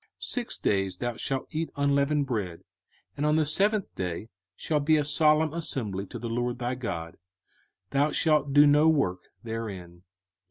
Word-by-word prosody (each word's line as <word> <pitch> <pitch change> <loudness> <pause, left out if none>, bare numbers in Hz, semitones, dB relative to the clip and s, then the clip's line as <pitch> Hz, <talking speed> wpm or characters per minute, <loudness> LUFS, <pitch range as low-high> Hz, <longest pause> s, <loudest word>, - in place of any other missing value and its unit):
05:016:008 - - -35 0.2
Six 245 -2 -2
days 95 -2 0
thou 120 +2 -3
shalt 135 +3 -3
eat 160 +1 -2
unleavened 140 +1 +2
bread: 100 -10 -3 0.5
and 145 - -3
on 150 0 +3
the 155 -1 +3
seventh 200 +6 +1
day 90 +4 -4 0.3
shall 155 -2 -1
be 155 +2 +3
a 150 - 0
solemn 155 +1 +3
assembly 110 - -3
to - - -7
the 120 - -5
LORD 120 +1 -2
thy 120 0 -2
God: 85 -10 -5 0.7
thou 145 +2 +2
shalt 150 -2 +2
do 145 +1 +7
no 150 +2 +5
work 140 - +2 0.2
therein. 100 -7 -6
140 Hz, 165 wpm, -27 LUFS, 110-150 Hz, 0.7 s, do